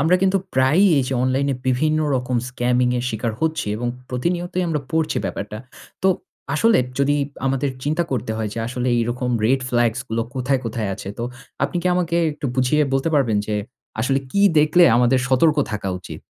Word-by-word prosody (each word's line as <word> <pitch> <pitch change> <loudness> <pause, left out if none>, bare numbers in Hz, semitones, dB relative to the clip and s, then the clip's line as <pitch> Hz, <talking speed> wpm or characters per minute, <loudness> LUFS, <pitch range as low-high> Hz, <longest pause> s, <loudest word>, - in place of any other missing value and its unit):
আমরা 165 +5 +4
কিন্তু 195 0 +3 0.2
প্রায়ই 150 +10 +4
এইযে 130 0 -1
অনলাইনে 135 +2 +1
বিভিন্ন 155 +5 +2 0.2
রকম 125 -1 -1
scamming 125 0 +1
এর 120 - -3
শিকার 110 +1 -2
হচ্ছি 160 -6 -1
এবং 120 +1 -2 0.2
প্রতিনিয়তই 175 +7 -1
আমরা 150 -3 -1
পড়ছি 160 -1 0
ব্যাপারটা। 105 +1 -4 0.4
তো 190 - +4 0.5
আসলে 225 +8 +4 0.2
যদি 145 +1 +2 0.3
আমাদের 135 +1 0 0.2
চিন্তা 155 +4 +1
করতে 115 -2 -2
হয় 110 -1 -2
যে - - -5
আসলে 125 +1 -2
এইরকম 120 +2 -1 0.2
red 130 +3 +3
flags 120 -1 +1
গুলো 115 +1 -1
কোথায়, 130 0 0
কোথায় 110 -2 -2
আছে? 95 - -8
তো 120 - -2 0.4
আপনি - - -3
কি - - -1
আমাকে 170 -1 0 0.2
একটু 145 -1 -5
বুঝিয়ে 130 +4 +2
বলতে 135 +4 +1
পারবেন 120 -7 +2
যে 105 - -2 0.5
আসলে 135 +4 +1
কি 200 - +1 0.2
দেখলে 155 +4 +5
আমাদের 125 +1 +4
সতর্ক 150 +4 +3 0.2
থাকা 105 -2 -3
উচিত? 90 - -9
130 Hz, 175 wpm, -21 LUFS, 120-155 Hz, 0.5 s, দেখলে